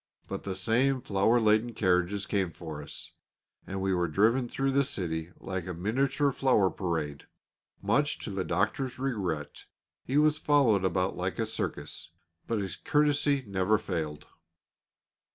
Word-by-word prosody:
But -, -, -4 dB
the 95 Hz, -1 st, -3 dB
same 125 Hz, +7 st, +2 dB
flower 105 Hz, +4 st, +3 dB
laden 110 Hz, +1 st, +2 dB
carriages 95 Hz, +1 st, +1 dB
came 95 Hz, -4 st, 0 dB
for 80 Hz, -2 st, -8 dB
us, 75 Hz, -, -8 dB, 0.6 s
and 95 Hz, 0 st, -4 dB
we 95 Hz, 0 st, +1 dB
were 90 Hz, -1 st, +1 dB
driven 115 Hz, -, +2 dB
through 135 Hz, +2 st, 0 dB
the 140 Hz, +1 st, +3 dB
city 85 Hz, -8 st, -3 dB
like 95 Hz, -2 st, -4 dB
a 90 Hz, -, -4 dB
miniature 135 Hz, -, +1 dB
flower 125 Hz, -9 st, +3 dB
parade. 80 Hz, -5 st, -3 dB, 0.6 s
Much -, -, +2 dB
to -, -, -4 dB
the -, -, -2 dB
Doctor's 130 Hz, -2 st, -1 dB
regret 95 Hz, -, -3 dB, 0.4 s
he 135 Hz, -, -1 dB
was 155 Hz, 0 st, +4 dB
followed 135 Hz, -11 st, +3 dB
about 95 Hz, 0 st, +1 dB
like -, -, -3 dB
a -, -, 0 dB
circus; -, -, -4 dB, 0.4 s
but 115 Hz, -, 0 dB
his 95 Hz, -3 st, -3 dB
courtesy 145 Hz, -2 st, +2 dB
never 100 Hz, +2 st, +2 dB
failed. 80 Hz, -7 st, -4 dB
100 Hz, 150 wpm, -29 LUFS, 90-130 Hz, 0.6 s, was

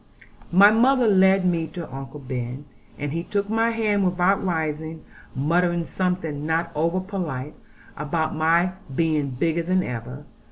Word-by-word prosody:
My 200 Hz, +4 st, +7 dB
mother 245 Hz, +2 st, +4 dB
led 190 Hz, -1 st, +4 dB
me 170 Hz, -3 st, +1 dB
to 165 Hz, +1 st, -7 dB
Uncle 135 Hz, +2 st, -7 dB
Ben, 130 Hz, 0 st, -5 dB, 0.3 s
and 145 Hz, -1 st, -3 dB
he 165 Hz, -, -1 dB
took 200 Hz, +2 st, -2 dB
my 225 Hz, +1 st, +2 dB
hand 215 Hz, -3 st, +1 dB
without 180 Hz, +1 st, +2 dB
rising, 160 Hz, -2 st, -3 dB, 0.3 s
muttering 170 Hz, +5 st, +1 dB
something 180 Hz, -6 st, -2 dB
not 165 Hz, +2 st, -1 dB
over 165 Hz, +4 st, 0 dB
polite, 165 Hz, -8 st, -4 dB, 0.4 s
about 155 Hz, +1 st, -2 dB
my 165 Hz, +3 st, +3 dB, 0.2 s
being 155 Hz, -3 st, +1 dB
bigger 160 Hz, +6 st, 0 dB
than 185 Hz, +2 st, +1 dB
ever. 125 Hz, +4 st, -6 dB
170 Hz, 145 wpm, -24 LUFS, 150-185 Hz, 0.4 s, My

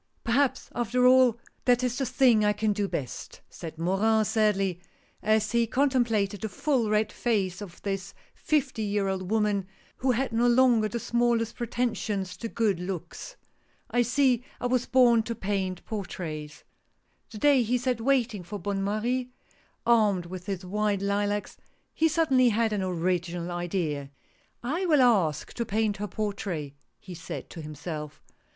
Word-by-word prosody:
" -, -, -42 dB
Perhaps 255 Hz, +3 st, +1 dB
after 245 Hz, +1 st, +1 dB
all 255 Hz, -2 st, +6 dB, 0.3 s
that 245 Hz, 0 st, +3 dB
is 250 Hz, 0 st, -1 dB
the 270 Hz, -, 0 dB
thing 250 Hz, -3 st, +4 dB
I 210 Hz, 0 st, +3 dB
can 210 Hz, 0 st, 0 dB
do 205 Hz, -1 st, -1 dB
best," 135 Hz, -9 st, -6 dB
said 160 Hz, -1 st, -8 dB
Morin, 210 Hz, +6 st, +2 dB
sadly, 195 Hz, -5 st, +1 dB, 0.4 s
as 215 Hz, 0 st, +2 dB
he 235 Hz, -1 st, +2 dB
contemplated 230 Hz, -7 st, +1 dB
the 220 Hz, -, -3 dB
full 245 Hz, +1 st, 0 dB
red 215 Hz, 0 st, +1 dB
face 200 Hz, -6 st, -1 dB
of 180 Hz, -4 st, -9 dB
this 195 Hz, -1 st, -4 dB, 0.2 s
fifty 275 Hz, -6 st, -1 dB
year 205 Hz, -1 st, 0 dB
old 190 Hz, -1 st, -3 dB
woman, 210 Hz, -3 st, +1 dB, 0.3 s
who 260 Hz, -, -1 dB
had 255 Hz, 0 st, 0 dB
no 235 Hz, +2 st, +3 dB
longer 240 Hz, -3 st, +4 dB
the 235 Hz, +2 st, -4 dB
smallest 235 Hz, -1 st, +1 dB
pretensions 220 Hz, -6 st, -2 dB
to 230 Hz, -, -4 dB
good 215 Hz, -6 st, 0 dB
looks. 180 Hz, -1 st, -6 dB, 0.3 s
" -, -, -31 dB
I 245 Hz, -, +3 dB
see 250 Hz, 0 st, +2 dB, 0.2 s
I -, -, -4 dB
was 245 Hz, 0 st, +1 dB
born 245 Hz, -3 st, +5 dB
to 230 Hz, +1 st, -4 dB
paint 190 Hz, -3 st, -3 dB
portraits." 160 Hz, -7 st, -6 dB, 0.7 s
The 215 Hz, -, -9 dB
day 280 Hz, +2 st, +4 dB
he 240 Hz, +2 st, +1 dB
sat 250 Hz, -1 st, -1 dB
waiting 240 Hz, -5 st, +1 dB
for 180 Hz, +4 st, -7 dB
Bonne 195 Hz, +1 st, -2 dB
Marie, 240 Hz, +5 st, -1 dB, 0.6 s
armed 210 Hz, -6 st, +3 dB
with 180 Hz, +2 st, -8 dB
his 190 Hz, -2 st, -4 dB
white 205 Hz, +1 st, 0 dB
lilacs, 205 Hz, +1 st, -1 dB, 0.4 s
he 320 Hz, -, +3 dB
suddenly 275 Hz, -6 st, +3 dB
had 220 Hz, 0 st, +1 dB
an 205 Hz, -, -1 dB
original 175 Hz, -1 st, -1 dB
idea: 170 Hz, -5 st, -2 dB, 0.3 s
" -, -, -39 dB, 0.2 s
I -, -, -1 dB
will 300 Hz, -5 st, +5 dB
ask 195 Hz, -11 st, +2 dB
to 235 Hz, -, -2 dB
paint 215 Hz, -1 st, 0 dB
her 210 Hz, +1 st, -3 dB
portrait! 195 Hz, -8 st, -4 dB, 0.2 s
" -, -, -49 dB
he 185 Hz, -, -10 dB
said 170 Hz, -, -7 dB
to 165 Hz, -, -7 dB
himself. 150 Hz, 0 st, -7 dB
215 Hz, 165 wpm, -27 LUFS, 190-240 Hz, 0.7 s, all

